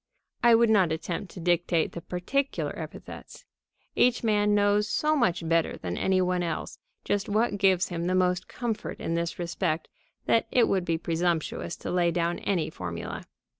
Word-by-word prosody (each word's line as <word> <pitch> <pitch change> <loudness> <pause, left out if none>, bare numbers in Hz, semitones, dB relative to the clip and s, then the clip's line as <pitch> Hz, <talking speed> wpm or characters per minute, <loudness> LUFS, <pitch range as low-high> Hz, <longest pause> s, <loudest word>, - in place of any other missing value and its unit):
(I 235 -1 +6
would 230 -1 +4
not 190 -6 +4
attempt 170 +3 -4
to - - -9
dictate 175 -1 +1
the 170 - -7
particular 265 - -2
epithets. - - -9 0.5
Each 245 -1 +3
man 210 -2 +3
knows 205 0 +2
so 305 +6 +1
much 180 - +1
better 165 0 +1
than 90 -1 -4
any 190 0 +1
one 180 0 +1
else 170 -1 -4 0.3
just 205 0 -1
what 210 0 +1
gives 190 -2 +3
him 170 -1 -3
the 185 - +1
most 180 0 +1
comfort 235 -3 -4
in 165 - -2
this 170 0 -2
respect 170 -2 -2 0.4
that 230 - +2
it 245 -2 +4
would 190 -2 0
be 165 -2 0
presumptuous 170 0 -1
to - - -6
lay 175 -1 +2
down 170 0 -1
any 175 -6 -1
formula. 90 - -6
180 Hz, 170 wpm, -27 LUFS, 170-205 Hz, 0.5 s, I